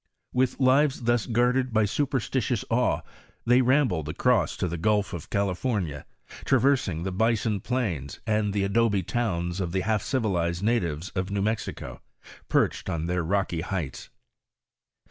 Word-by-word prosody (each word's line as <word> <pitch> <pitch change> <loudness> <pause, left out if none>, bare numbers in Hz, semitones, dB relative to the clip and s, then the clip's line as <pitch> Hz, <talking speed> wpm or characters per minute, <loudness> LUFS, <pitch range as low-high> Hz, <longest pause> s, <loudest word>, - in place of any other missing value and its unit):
With 125 +1 +1
lives 135 0 +3
thus 120 -1 +1
guarded 125 +2 +2
by 110 -1 +3
superstitious 130 -1 -1
awe, 125 +2 +2 0.4
they 125 +2 +5
'rambled 125 - +2
across 125 +10 +1
to 90 - -1
the 85 0 -4
gulf 105 +2 +1
of 85 -4 -7
California, 95 - -1 0.4
traversing 125 - +2
the 95 - -2
bison 110 +1 +1
plains 95 - -3
and 105 -2 +1
the 100 0 0
adobe 100 -1 +2
towns 85 -5 -2
of 90 -2 -3
the 95 - +1
half 110 +1 0
civilized 90 -9 -1
natives 90 -7 0
of 95 0 -2
New 100 0 -1
Mexicp, 100 - -3 0.5
perched - - +1
on 80 -1 -2
their 90 +1 0
rocky 90 -1 0
heights. 90 -5 -4
105 Hz, 145 wpm, -26 LUFS, 90-120 Hz, 0.5 s, they